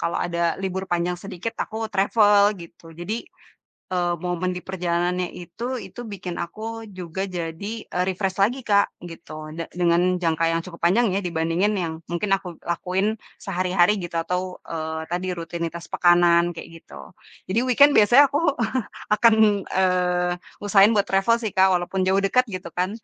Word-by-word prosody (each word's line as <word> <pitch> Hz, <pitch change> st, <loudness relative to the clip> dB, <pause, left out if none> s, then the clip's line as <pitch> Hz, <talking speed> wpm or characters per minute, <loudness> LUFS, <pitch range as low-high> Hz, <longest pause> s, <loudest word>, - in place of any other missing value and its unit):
kalau 170 Hz, -, -1 dB
ada 170 Hz, -1 st, -3 dB, 0.2 s
libur 190 Hz, 0 st, -2 dB
panjang 175 Hz, +1 st, 0 dB
sedikit 195 Hz, +4 st, -6 dB
aku 220 Hz, -, -8 dB, 0.2 s
travel 205 Hz, +1 st, +4 dB
gitu. 170 Hz, 0 st, -13 dB, 0.2 s
Jadi 185 Hz, +5 st, -3 dB, 0.8 s
e -, -, +1 dB, 0.3 s
momen 180 Hz, +1 st, -1 dB
di -, -, -4 dB
perjalanannya 180 Hz, -1 st, -1 dB
itu, 175 Hz, +6 st, -8 dB, 0.2 s
itu -, -, -10 dB
bikin 180 Hz, -2 st, -6 dB
aku 190 Hz, +6 st, -8 dB, 0.4 s
juga 180 Hz, +2 st, -4 dB
jadi 165 Hz, +3 st, -5 dB, 0.3 s
e -, -, -1 dB
refresh 190 Hz, 0 st, -2 dB
lagi 245 Hz, +6 st, +1 dB
Kak, 200 Hz, -1 st, +4 dB, 0.2 s
gitu. 165 Hz, -1 st, -11 dB, 0.2 s
Da 165 Hz, -, -3 dB, 0.2 s
dengan 170 Hz, 0 st, +4 dB, 0.2 s
jangka 165 Hz, 0 st, +1 dB
yang 165 Hz, -, 0 dB
cukup 170 Hz, -2 st, -11 dB
panjang 225 Hz, +8 st, +4 dB
ya, 200 Hz, -, +1 dB
dibandingin 170 Hz, +4 st, 0 dB
yang 160 Hz, -1 st, -3 dB, 0.2 s
mungkin 185 Hz, +4 st, -2 dB
aku 190 Hz, -2 st, -9 dB, 0.2 s
lakuin 185 Hz, +3 st, -1 dB, 0.4 s
sehari-hari 180 Hz, 0 st, +2 dB
gitu 170 Hz, -1 st, -5 dB
atau, 180 Hz, +2 st, -1 dB, 0.3 s
eee, 160 Hz, -1 st, -3 dB
tadi 180 Hz, +1 st, -2 dB
rutinitas 170 Hz, 0 st, -5 dB
pekanan, 175 Hz, -1 st, +4 dB
kayak -, -, -9 dB
gitu. -, -, -16 dB, 0.5 s
Jadi 215 Hz, +5 st, +1 dB
weekend 285 Hz, +4 st, +6 dB
biasanya 240 Hz, +7 st, +7 dB
aku 290 Hz, -, +1 dB, 0.8 s
akan, 225 Hz, +1 st, +5 dB, 0.4 s
eee, 180 Hz, -1 st, +2 dB, 0.3 s
usahain 200 Hz, 0 st, +6 dB
buat 205 Hz, -1 st, +2 dB
travel 195 Hz, +5 st, +3 dB
sih 215 Hz, -, -2 dB
Kak, 190 Hz, 0 st, +6 dB
walaupun 180 Hz, +2 st, -1 dB
jauh 190 Hz, +1 st, +3 dB
dekat 250 Hz, +6 st, +3 dB
gitu 185 Hz, -3 st, -6 dB
kan. 180 Hz, +1 st, +1 dB
180 Hz, 160 wpm, -23 LUFS, 170-200 Hz, 0.8 s, biasanya